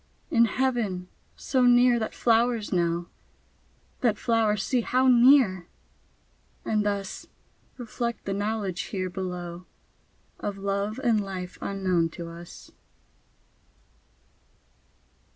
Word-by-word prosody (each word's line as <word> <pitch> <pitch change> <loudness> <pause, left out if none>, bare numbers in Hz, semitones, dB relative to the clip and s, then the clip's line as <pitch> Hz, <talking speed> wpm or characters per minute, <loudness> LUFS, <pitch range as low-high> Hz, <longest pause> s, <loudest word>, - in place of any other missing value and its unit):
In 235 -5 +5
Heaven! 220 -7 -1 0.3
so 260 -2 -1
near 245 0 +5
that 220 - -4
flowers 230 -2 +1
know! 170 -1 0 0.9
That 230 -5 +1
flowers 220 -3 +1
see 250 -2 +1
how 255 +3 +1
near! 240 -8 +5 1.0
and 215 -1 +1
thus 200 -2 -3 0.5
Reflect 235 -1 -4
the 195 - -2
knowledge 205 -2 -2
here 185 -2 -4
below 180 -1 -6 0.7
Of 205 -1 -4
love 200 +3 -2
and 225 -4 +2
life 185 -2 -7
unknown 185 -4 0
to 170 -1 -6
us. 170 +1 -12
205 Hz, 100 wpm, -26 LUFS, 185-235 Hz, 1.0 s, In